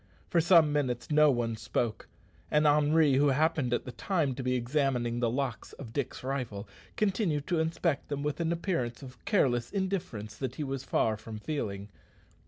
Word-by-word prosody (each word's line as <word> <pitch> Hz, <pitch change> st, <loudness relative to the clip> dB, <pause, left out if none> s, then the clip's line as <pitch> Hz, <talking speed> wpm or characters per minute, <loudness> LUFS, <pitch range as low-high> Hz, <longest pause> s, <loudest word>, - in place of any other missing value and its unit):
For 170 Hz, -, +4 dB
some 165 Hz, -3 st, +5 dB
minutes 130 Hz, -3 st, -1 dB
no 150 Hz, 0 st, +6 dB
one 120 Hz, -3 st, 0 dB
spoke, 110 Hz, 0 st, -2 dB, 0.4 s
and 150 Hz, 0 st, +3 dB
Henri, 150 Hz, -1 st, +4 dB
who 145 Hz, +1 st, +4 dB
happened 150 Hz, -1 st, +2 dB
at 120 Hz, -, 0 dB
the 125 Hz, -, -6 dB
time 155 Hz, -, 0 dB
to 130 Hz, -, -5 dB
be 125 Hz, 0 st, 0 dB
examining 125 Hz, -2 st, 0 dB
the 120 Hz, -1 st, +1 dB
locks 125 Hz, -2 st, -3 dB
of 115 Hz, -5 st, -10 dB
Dick's 140 Hz, -3 st, -3 dB
rifle, 125 Hz, -7 st, -3 dB, 0.3 s
continued 190 Hz, -8 st, 0 dB
to 175 Hz, -3 st, 0 dB
inspect 160 Hz, -2 st, 0 dB
them 145 Hz, -1 st, -3 dB
with 150 Hz, +2 st, -2 dB
an 165 Hz, -1 st, 0 dB
appearance 165 Hz, -, -2 dB
of 130 Hz, -1 st, -12 dB
careless 125 Hz, -, +2 dB
indifference 185 Hz, -, -3 dB
that 130 Hz, -2 st, -4 dB
he 150 Hz, -, -3 dB
was 135 Hz, -1 st, -4 dB
far 110 Hz, -1 st, +1 dB
from 110 Hz, 0 st, -8 dB
feeling. 105 Hz, -6 st, -4 dB
140 Hz, 180 wpm, -30 LUFS, 120-160 Hz, 0.4 s, no